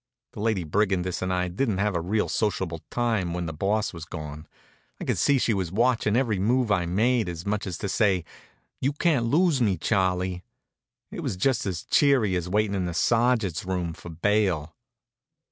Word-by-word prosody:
The - - -10
Lady 105 -4 0
Brigandess 95 +1 0
and 95 0 -1
I 90 0 0
didn't 100 +3 -1
have 105 +1 +1
a 85 - 0
real 105 +5 0
sociable 95 -7 -1
time 110 -8 0
while 90 -1 -2
the 80 - -4
Boss 100 +7 0
was 85 -2 -7
gone. 75 -3 -8 0.5
I - - -5
could - - 0
see 140 - +4
she 120 -3 +1
was 95 -4 -2
watchin' 115 0 +2
every 115 -7 +1
move 120 +3 +1
I 90 -4 +2
made, 110 +3 +1
as 85 0 -6
much 105 0 -2
as 90 - -4
to - - -4
say, 95 -4 +1 0.5
"You 135 +3 0
can't 145 -6 +1
lose 155 +1 +3
me, 100 -6 +2
Charlie." 95 -1 0 0.7
It - - -6
was 90 - -3
just 130 +2 +1
as 90 -5 -3
cheery 130 -10 +3
as 90 0 -2
waitin' 105 +1 +1
in 95 -2 -1
the 85 - -4
Sergeant's 115 -7 +2
room 90 -3 -2
for 85 - -11
bail. 85 -2 0
100 Hz, 190 wpm, -26 LUFS, 90-115 Hz, 0.7 s, see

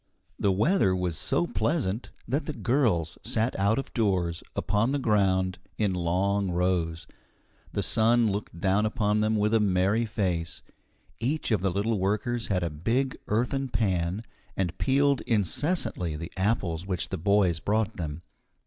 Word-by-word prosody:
The 100 - +2
weather 105 - +3
was 90 -3 -1
so 85 +2 0
pleasant 110 - -1 0.2
that 140 +6 -1
the 155 - -2
girls 115 - 0
sat 115 +3 0
out 100 +3 +3
of 135 - -4
doors, 90 -7 0
upon 105 +6 +1
the - - +2
ground, 95 -6 +1 0.2
in 105 -3 +1
long 95 +3 0
rows. 85 -2 0 0.7
The - - -1
sun 115 0 +3
looked 100 -4 -5
down 100 +4 +2
upon 105 -2 +1
them 110 +1 +2
with 105 +1 +1
a 115 - +5
merry 100 +3 +2
face. 90 -6 -2 0.6
Each 135 +5 -1
of 105 -5 +2
the 95 - +1
little 100 +3 0
workers 110 +5 -1
had 90 -3 0
a 85 - -2
big 115 - 0
earthen 125 +5 0
pan, 95 -3 0 0.3
and 90 -4 -1
peeled 140 0 +2
incessantly 115 - 0
the 85 +3 -6
apples 95 -3 -1
which 90 -4 -1
the - - -3
boys 95 -2 +3
brought 110 +3 0
them. 80 -1 -5
100 Hz, 155 wpm, -27 LUFS, 90-115 Hz, 0.7 s, a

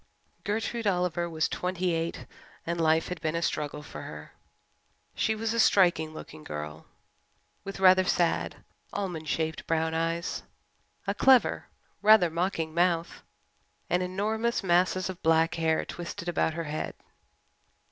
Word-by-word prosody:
Gertrude 225 +2 -2
Oliver 180 -2 0
was 160 -1 0
twenty 180 -1 -1
eight 165 +1 -3 0.4
and 170 0 -1
life 160 0 +3
had 180 -2 -5
been 160 -1 -1
a 170 - 0
struggle 150 -1 -2
for - - -9
her. - - -9 0.8
She 220 - 0
was 225 +1 -2
a 230 - -1
striking 175 -7 +4
looking 80 - -10
girl, 75 +1 -7 0.8
with 195 0 -7
rather 185 0 +6
sad, 175 -2 0 0.3
almond 175 -6 -4
shaped 160 0 -2
brown 160 0 +1
eyes, 165 +1 -1 0.6
a - - 0
clever, 265 -2 +4 0.3
rather 210 -5 +6
mocking 165 -2 -1
mouth, 170 -1 +1 0.7
and 180 - +3
enormous 215 +6 -1
masses 185 +1 +2
of 185 -2 -7
black 160 0 +3
hair 160 -1 +1
twisted 175 0 -7
about 160 -2 0
her 165 - -2
head. 155 0 -4
170 Hz, 135 wpm, -28 LUFS, 160-185 Hz, 0.8 s, rather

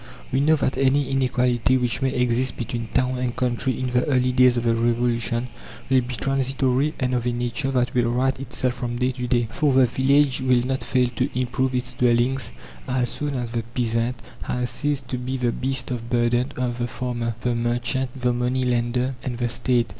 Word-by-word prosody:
We 130 - +2
know 155 +3 +4
that 140 -3 -1
any 135 +1 +2
inequality 125 -1 +2
which 125 0 -1
may 135 - +2
exist 125 0 0
between 115 -1 -4
town 130 +2 0
and 125 -1 -2
country 125 +1 -1
in 130 -1 -2
the 125 0 +2
early 130 -3 +2
days 125 -1 +5
of 120 - 0
the 115 -1 +2
Revolution 120 0 0 0.4
will 130 -1 +5
be 125 +1 -5
transitory 135 +2 0
and 130 -2 0
of 125 -1 0
a - - +2
nature 120 +1 -2
that 125 -2 0
will 120 -1 +2
right 130 +2 +1
itself 130 -1 -2
from 120 -1 -4
day 125 +1 +1
to 125 -1 -4
day; 120 -2 +1
for 150 +1 +1
the 130 0 +6
village 135 +2 +2
will 125 -2 +3
not 130 0 -1
fail 125 -2 +2
to 130 +2 +1
improve 130 +1 0
its 125 0 -2
dwellings 125 - +1 0.4
as 125 -1 0
soon 145 -1 -3
as 120 -2 -3
the 115 -1 -1
peasant 115 0 0 0.3
has 125 0 -2
ceased 140 0 -2
to 125 - -2
be 130 +2 -3
the 125 -2 +1
beast 130 +2 -1
of 120 -1 -4
burden 120 +1 +1
of 125 -1 -2
the 120 - -1
farmer, 120 -2 -3
the 125 -1 0
merchant, 120 +2 -1
the 125 0 +1
money 125 +2 0
lender, 125 +1 0
and 125 -2 -3
the 120 0 0
State. 120 0 +1
125 Hz, 205 wpm, -23 LUFS, 120-130 Hz, 0.4 s, the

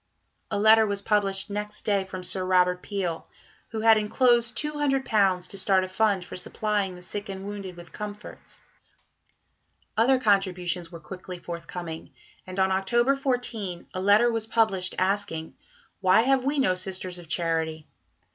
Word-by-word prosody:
A - - -1
letter 220 +1 +6
was 200 -1 -2
published 200 -2 +1
next 210 +1 -5
day 200 -2 +1
from 185 -1 -7
Sir 185 +1 -2
Robert 180 -1 +3
Peel, 185 -5 -3 0.4
who 220 -1 -4
had 225 -1 +6
enclosed 235 +2 +2
£200 265 -11 +1
to 195 - -7
start 190 0 +3
a - - -3
fund 195 -1 +1
for - - -9
supplying 200 0 -2
the 180 - -12
sick 205 +3 -6
and 190 0 -6
wounded 200 -3 -7
with 170 -1 -12
comforts. 210 -1 -9 1.3
Other 255 +4 +4
contributions 185 -6 0
were 170 - -9
quickly 180 +2 -8
forthcoming, 170 -1 -7 0.3
and 185 0 -7
on 190 0 +3
October 240 +8 +2
14 245 -9 -2
a 185 - -3
letter 210 +5 +5
was 225 -1 -2
published 205 -5 +1
asking: 185 -4 -1 0.5
"Why 190 +2 +5
have 265 +1 +2
we 285 +2 0
no 260 -9 +3
Sisters 185 -1 -4
of 170 - -12
Charity? 160 -1 -1
195 Hz, 155 wpm, -26 LUFS, 180-220 Hz, 1.3 s, letter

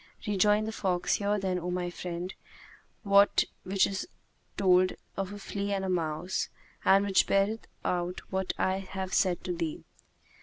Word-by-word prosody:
Rejoined 210 +1 +3
the - - -2
fox, 185 -5 0
"Hear 205 0 +1
then, 190 -2 -1
O 175 +1 -4
my 180 0 -2
friend, 175 +1 -5 0.7
that 200 0 +5 0.2
which 190 +1 +3
is 195 -1 -3 0.5
told 185 -1 +4 0.2
of 195 0 -3
a 205 - -6
flea 200 0 -3
and 195 -1 -1
a - - -2
mouse 170 0 -1 0.3
and 195 +1 +5
which 195 -2 +3
beareth 200 +3 +1 0.2
out 180 0 -1
what 190 0 0
I 190 0 +1
have 190 -1 -5
said 185 -3 +2
to 180 - -2
thee." 165 -2 -3
190 Hz, 160 wpm, -29 LUFS, 180-200 Hz, 0.7 s, that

